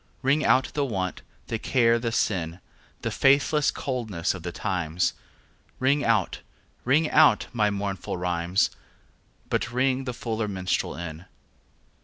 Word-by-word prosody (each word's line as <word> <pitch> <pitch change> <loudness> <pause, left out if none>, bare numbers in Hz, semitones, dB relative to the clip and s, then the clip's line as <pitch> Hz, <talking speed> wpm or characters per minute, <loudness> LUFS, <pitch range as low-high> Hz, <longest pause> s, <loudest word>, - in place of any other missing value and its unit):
Ring 140 +4 +3
out 130 +3 +3
the 145 - 0
want, 95 -8 -2 0.2
the 115 - -3
care 115 -2 +3
the 115 -1 -2
sin, 85 -6 -1 0.4
The - - -1
faithless 140 +2 +3
coldness 110 -10 -2
of 90 - -8
the 90 +1 -5
times; 90 -3 -1 0.6
Ring 140 +3 +2
out, 110 -5 +1 0.4
ring 150 +5 +3
out 155 -1 +5
my 105 -3 +2
mournful 100 -2 -3
rhymes, 90 +1 +1 0.8
But 115 - 0
ring 130 +1 +1
the 125 - -3
fuller 115 -4 -2
minstrel 95 -2 -2
in. 85 0 -7
110 Hz, 135 wpm, -26 LUFS, 90-130 Hz, 0.8 s, out